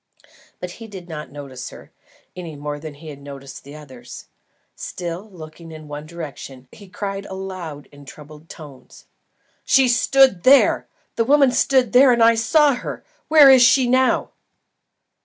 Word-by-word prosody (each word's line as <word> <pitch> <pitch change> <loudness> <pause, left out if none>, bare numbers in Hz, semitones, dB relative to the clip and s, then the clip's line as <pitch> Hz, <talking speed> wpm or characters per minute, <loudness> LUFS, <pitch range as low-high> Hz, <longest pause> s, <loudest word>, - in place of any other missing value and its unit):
But 180 - -7
he 225 +5 -11
did 190 -4 -11
not 150 -4 -8
notice 135 -3 -9
her, - - -15 0.4
any 170 -4 -8
more 145 0 -6
than 155 -1 -9
he 155 +2 -12
had 140 -1 -11
noticed 140 -1 -11
the 140 +2 -13
others. 140 -5 -13 0.5
Still 175 +4 -7
looking 165 -2 -13
in 155 -1 -11
the - - -15
one 150 +1 -8
direction, 145 -5 -10
he 200 -3 -15
cried 195 0 -6
aloud 185 -6 -8
in 145 0 -16
troubled 150 +3 -14
tones: 140 -5 -14 0.6
"She 265 -1 +3
stood 250 -3 +3
there! 270 +5 +4 0.3
the 230 - +2
woman 275 +1 +3
stood 255 -4 +1
there 255 +1 +6
and 235 -1 +3
I 230 0 +6
saw 285 +6 +2
her! 245 - -7 0.2
Where 300 -3 +7
is 260 -2 +6
she 255 +1 +4
now?" 255 +1 +1
175 Hz, 160 wpm, -20 LUFS, 150-240 Hz, 0.6 s, Where